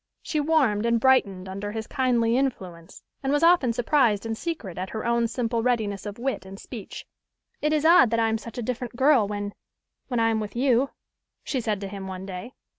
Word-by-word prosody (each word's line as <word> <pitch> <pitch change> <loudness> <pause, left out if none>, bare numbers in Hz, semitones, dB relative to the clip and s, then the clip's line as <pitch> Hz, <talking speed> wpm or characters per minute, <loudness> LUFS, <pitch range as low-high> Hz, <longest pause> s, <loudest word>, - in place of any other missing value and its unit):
She 310 - -1
warmed 275 -9 +2
and 235 0 +2
brightened 200 -7 +2
under 200 +2 -5
his 220 -1 -4
kindly 240 -3 +1
influence, 185 -10 -3 0.2
and 270 - -1
was 290 +2 +2
often 335 -8 +5
surprised 230 -3 +2
in 225 - -2
secret 225 - -5
at 185 +1 -4
her 220 - -5
own 235 0 +2
simple 230 0 -1
readiness 220 -5 -1
of 205 - -6
wit 255 -3 -2
and 190 +1 -10
speech. 225 -6 -9 0.6
"It 300 - +1
is 305 0 +1
odd 330 -7 +7
that 230 +1 +1
I 225 - +3
am 220 0 0
such 230 +1 -10
a 245 - -3
different 245 +1 -4
girl 260 -4 +4
when 205 0 -4 0.5
when 245 -3 -1
I 225 0 +3
am 220 - 0
with 210 0 -5
you," 260 +1 +2 0.5
she 260 - -2
said 215 -3 -1
to 200 - -4
him 195 -1 -7
one 190 0 -6
day. 195 +6 -7
230 Hz, 210 wpm, -25 LUFS, 205-260 Hz, 0.6 s, odd